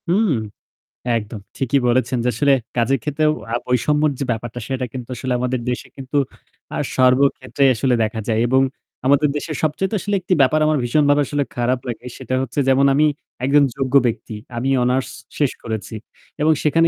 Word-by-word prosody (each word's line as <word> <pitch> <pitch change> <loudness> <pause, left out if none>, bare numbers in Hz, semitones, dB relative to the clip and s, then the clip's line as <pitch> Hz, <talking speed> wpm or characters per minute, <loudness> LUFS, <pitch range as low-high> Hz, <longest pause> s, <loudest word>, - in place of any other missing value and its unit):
হুম, 195 +3 +2 0.9
একদম 105 0 -6 0.2
ঠিকই 135 +1 +1
বলেছেন। 125 +1 +1 0.2
আসলে 140 +5 +3 0.2
কাজের 120 +3 +2
ক্ষেত্রেও 150 +1 +1 0.2
আ - - +2
বৈষম্যের 150 +5 +2
যে - - 0
ব্যাপারটা 120 +1 -4
সেটা 130 -1 -2
কিন্তু 125 -2 -7
আসলে 125 +2 -2
আমাদের 125 0 -1
দেশে 125 - -3
কিন্তু 135 +1 -3 0.6
আ - - -2 0.2
সর্বক্ষেত্রে 130 +1 +2
আসলে 125 +4 +1
দেখা 110 +1 -2
যায়। 110 -1 +1
এবং 130 +1 +4 0.4
আমাদের 140 +2 +4
দেশে 155 - -5
সবচাইতে 185 +7 0
আসলে 205 +2 -1
একটি 185 - 0
ব্যাপার 135 +3 +4
আমার 155 0 +2
ভীষণভাবে 145 +3 +3
আসলে 145 -1 0
খারাপ 125 +1 +1
লাগে 120 0 -5
সেটা 130 -1 -3
হচ্ছে 130 +2 -3
যেমন 135 +1 +4
আমি 150 +3 +4 0.4
একজন 145 +2 +5
যোগ্য 135 -1 -2
ব্যক্তি। 115 -1 -4 0.2
আমি 130 +3 -1
অনার্স 125 +2 +1 0.3
শেষ 145 -4 +2
করেছি 110 -1 -5 0.5
এবং 155 +1 +4
সেখানে 165 +2 +4
130 Hz, 165 wpm, -20 LUFS, 120-145 Hz, 0.9 s, একজন